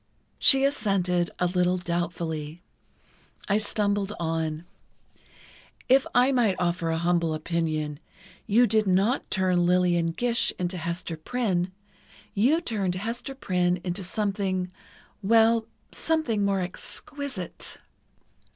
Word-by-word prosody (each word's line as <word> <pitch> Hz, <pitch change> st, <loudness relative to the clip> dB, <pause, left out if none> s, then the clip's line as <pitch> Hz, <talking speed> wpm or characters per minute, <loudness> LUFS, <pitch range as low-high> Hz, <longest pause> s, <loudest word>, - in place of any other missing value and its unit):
She 270 Hz, -1 st, +7 dB
assented, 195 Hz, -10 st, +1 dB
a 180 Hz, -, +1 dB
little 180 Hz, 0 st, +1 dB
doubtfully. 170 Hz, -2 st, -3 dB, 0.8 s
I 205 Hz, +1 st, +2 dB
stumbled 205 Hz, -1 st, 0 dB
on: 160 Hz, -1 st, -2 dB, 1.2 s
"If 265 Hz, +1 st, +4 dB
I 250 Hz, +2 st, +5 dB
might 235 Hz, -7 st, +2 dB
offer 175 Hz, -1 st, -1 dB
a 165 Hz, -, 0 dB
humble 170 Hz, -1 st, +1 dB
opinion, 155 Hz, -2 st, -2 dB, 0.5 s
you 230 Hz, +4 st, +5 dB
did 215 Hz, -1 st, +2 dB
not 195 Hz, +8 st, +2 dB
turn 185 Hz, -2 st, +2 dB
Lillian 175 Hz, -2 st, +3 dB
Gish 240 Hz, +4 st, +2 dB
into 180 Hz, 0 st, -2 dB
Hester 170 Hz, 0 st, -4 dB
Prynne; 185 Hz, -1 st, -1 dB, 0.6 s
you 265 Hz, +11 st, +3 dB
turned 200 Hz, -, -2 dB
Hester 230 Hz, +7 st, -4 dB
Prynne 180 Hz, -7 st, 0 dB
into 180 Hz, +2 st, -3 dB
something—well—something 210 Hz, -, -1 dB
more 195 Hz, -1 st, +1 dB
exquisite." 200 Hz, -, -5 dB
185 Hz, 105 wpm, -26 LUFS, 175-220 Hz, 1.2 s, She